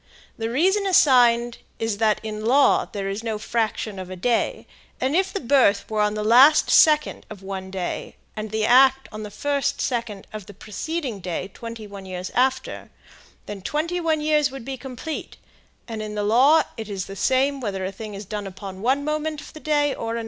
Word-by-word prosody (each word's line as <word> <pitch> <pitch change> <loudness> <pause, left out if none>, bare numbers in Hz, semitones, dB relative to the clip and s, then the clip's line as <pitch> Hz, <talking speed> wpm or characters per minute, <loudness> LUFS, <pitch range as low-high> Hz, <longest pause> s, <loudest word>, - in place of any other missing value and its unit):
The 225 0 -3
reason 380 - +2
assigned 240 -8 +4 0.2
is 225 -2 -2
that 215 -2 +2
in 215 -1 -5
law 270 +5 +4
there 195 -1 -4
is 200 +3 -4
no 225 -2 -2
fraction 215 -2 -2
of 185 -1 -7
a 185 - -6
day; 230 +6 0 0.3
and 265 +4 0
if 380 +2 +2
the 400 - -3
birth 245 -6 +3
were 215 -1 +1
on 210 0 +1
the 210 - -2
last 255 +8 +6
second 305 -1 +4
of 200 -3 -10
one 190 -1 -6
day 190 -2 -5 0.2
and 215 0 -5
the 220 0 0
act 265 +2 +5
on 215 0 -7
the 210 - -6
first 285 +6 -1
second 230 -6 -3
of 210 -3 -7
the 205 - -12
preceding 250 - -4
day 180 +1 -4
twenty 230 -2 -8
one 200 -2 -10
years 185 0 -5
after, 260 +1 0 0.6
then 205 -2 -7
twenty 315 - -2
one 320 -3 0
years 300 -1 +2
would 265 -3 -9
be 270 0 -4
complete, 265 +4 -7 0.5
and 225 -2 -5
in 210 0 -5
the 210 - -1
law 260 +9 +5
it 220 -1 -6
is 195 -2 -4
the 195 - -9
same 270 +5 +1
whether 195 -5 -3
a 190 - -3
thing 210 +1 -8
is 200 +1 -7
done 205 0 -5
upon 190 0 -9
one 265 +5 +1
moment 305 0 -2
of - - -12
the 310 - -10
day 290 -2 +1
or 230 0 -4
another." - - -2
230 Hz, 205 wpm, -23 LUFS, 205-275 Hz, 0.6 s, last